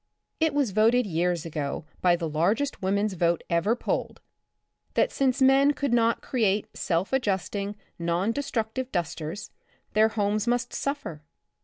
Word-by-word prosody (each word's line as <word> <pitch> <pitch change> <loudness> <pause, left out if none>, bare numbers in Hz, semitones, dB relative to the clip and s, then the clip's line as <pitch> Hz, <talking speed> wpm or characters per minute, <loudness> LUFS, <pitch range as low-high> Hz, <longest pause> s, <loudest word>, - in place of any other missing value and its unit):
It 320 -3 +2
was 280 -7 +1
voted 225 +4 +3
years 175 -2 0
ago 150 -2 -4 0.2
by 175 -1 +4
the 170 -1 -3
largest 195 - 0
womans' 200 +2 +1
vote 170 -1 +1
ever 170 +7 +2
polled, - - -3 0.8
that - - +3
since 265 -1 +1
men 270 +2 +5
could 280 -4 -1
not 230 -1 +2
create 210 -5 0
self 175 +6 -1
adjusting, 205 -3 -1 0.2
non 170 +5 0
destructive 255 -1 -3
dusters, 170 +3 -4 0.4
their 215 +1 +5
homes 210 0 0
must 245 +1 0
suffer. 280 - -3
210 Hz, 140 wpm, -26 LUFS, 175-250 Hz, 0.8 s, men